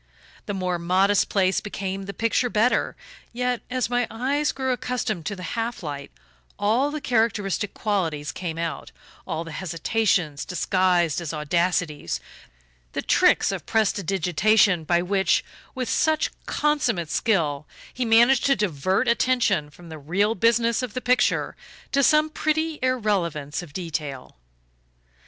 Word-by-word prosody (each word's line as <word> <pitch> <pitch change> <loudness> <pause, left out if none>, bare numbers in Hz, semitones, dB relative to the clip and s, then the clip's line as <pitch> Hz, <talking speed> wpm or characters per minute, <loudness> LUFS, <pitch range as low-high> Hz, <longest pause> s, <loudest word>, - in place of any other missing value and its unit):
The 205 - -2
more 180 -2 -1
modest 190 +4 +2
place 190 -2 +2
became 195 -2 -4
the 200 - -5
picture 230 +2 +1
better; 225 +3 +1 0.4
yet, 250 0 -1
as 255 -2 0
my 245 0 0
eyes 275 +6 0
grew 265 -1 -2
accustomed 245 -8 -3
to 200 - -3
the 180 - -9
half 230 -3 -3
light, 145 -2 -5 0.5
all 230 +8 +2
the 305 +1 -4
characteristic 220 -5 0
qualities 165 -9 -1
came 170 -3 -5
out 165 -3 -4 0.4
all 165 -2 -3
the 165 - -9
hesitations 175 -2 0
disguised 180 -2 +1
as 165 -1 -4
audacities, 165 0 -1 0.7
the - - -3
tricks - - +3
of - - -6
prestidigitation 195 -2 +2
by 175 +2 +2
which, 190 +1 +1 0.3
with 255 -2 -3
such 315 +4 +1 0.2
consummate 250 - 0
skill, 155 -10 0 0.3
he 255 - -2
managed 240 +4 +5
to 275 - +4
divert 190 - 0
attention 235 -10 +2
from 170 +3 -15
the 160 -1 -8
real 195 +9 +1
business 230 +2 +2
of 250 -2 -5
the - - 0
picture 250 0 +1 0.4
to 280 - +3
some 305 +2 +4
pretty 315 0 -1
irrelevance 190 - -1
of 175 -4 -11
detail. 150 -6 -5
200 Hz, 140 wpm, -24 LUFS, 170-245 Hz, 0.7 s, managed